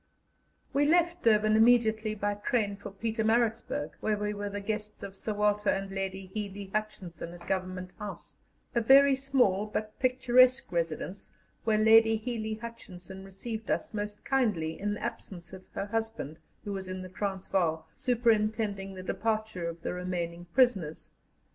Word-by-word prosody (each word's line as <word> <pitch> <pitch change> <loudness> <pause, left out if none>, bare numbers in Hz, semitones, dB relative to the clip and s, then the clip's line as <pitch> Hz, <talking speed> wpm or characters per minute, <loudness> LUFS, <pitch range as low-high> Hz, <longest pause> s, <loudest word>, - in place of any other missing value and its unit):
We 290 +1 +3
left 345 +2 +3
Durban 215 -3 +4
immediately 220 -1 +4
by 205 0 0
train 205 0 0
for 200 +1 -8
Pietermaritzburg, 220 -4 0
where 215 -1 0
we 210 0 -2
were 205 0 -4
the 205 0 -4
guests 210 +1 -4
of 195 -1 -7
Sir 210 +2 -3
Walter 210 0 +2
and 195 0 -1
Lady 195 -1 -4
Hely 200 -2 -5
Hutchinson, 190 -6 -4
at 175 0 -12
Government 185 0 -3
House, 210 -2 -8 0.4
a 235 - +2
very 275 +4 +7
small 250 -7 +2
but 215 0 -4
picturesque 255 -2 +4
residence 170 +3 -3 0.4
where 220 -1 +3
Lady 225 +1 +6
Hely 220 -1 -3
Hutchinson 190 -5 -9
received 215 +4 -6
us - - -1
most 205 0 -5
kindly 205 -13 +1
in 205 +1 -1
the - - -8
absence 190 -6 -6
of 185 0 -11
her - - -2
husband, 220 -8 -3 0.2
who 205 - -4
was 190 -1 -5
in 185 0 -4
the - - -7
Transvaal, 185 -4 -1
superintending 215 -5 +1
the 185 - -7
departure 215 -3 -1
of 170 0 -9
the - - -2
remaining 175 -1 -3
prisoners. 190 - +1
210 Hz, 155 wpm, -30 LUFS, 190-225 Hz, 0.4 s, very